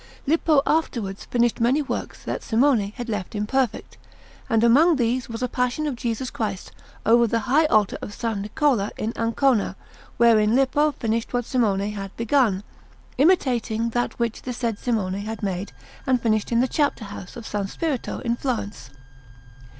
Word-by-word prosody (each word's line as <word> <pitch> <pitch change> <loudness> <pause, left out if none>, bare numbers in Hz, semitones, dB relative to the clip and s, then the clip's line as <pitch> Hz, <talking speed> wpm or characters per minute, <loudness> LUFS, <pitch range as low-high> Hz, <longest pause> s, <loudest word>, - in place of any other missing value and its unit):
Lippo 305 -1 +3
afterwards 230 -11 -1
finished 240 -1 +1
many 250 +5 +3
works 280 - -5
that - - -3
Simone 230 -4 +2
had 245 - -6
left 210 -3 -4
imperfect, 230 +3 -1 0.5
and 225 -2 +3
among 300 +9 +5
these 245 -1 0
was 230 +2 -4
a - - +1
Passion 250 +4 -1
of 290 -4 -2
Jesus 235 +1 -3
Christ 205 -4 -4 0.3
over 235 +1 +5
the 230 +1 0
high 290 +6 +3
altar 215 -7 +2
of - - -5
S. 225 +2 -3
Niccola 210 +2 0
in 220 +2 -2
Ancona, 230 -2 +1 0.4
wherein 225 -1 +4
Lippo 290 +3 +3
finished 230 -1 -2
what 245 -1 0
Simone 210 -6 +1
had 195 -2 -7
begun, 230 -5 +2 0.6
imitating 245 - +2
that 240 +1 -2
which 235 -2 -2
the 250 - -5
said 230 -3 -2
Simone 215 -7 -1
had 220 +1 -6
made 190 0 -3 0.4
and 255 -1 +3
finished 215 -2 0
in 235 0 +3
the 260 - +2
Chapter 285 -6 0
house 200 -2 -9
of 235 - -8
S. 200 -2 -3
Spirito 305 -7 -3
in 235 -2 0
Florence. 215 - -4
235 Hz, 165 wpm, -23 LUFS, 215-260 Hz, 0.6 s, among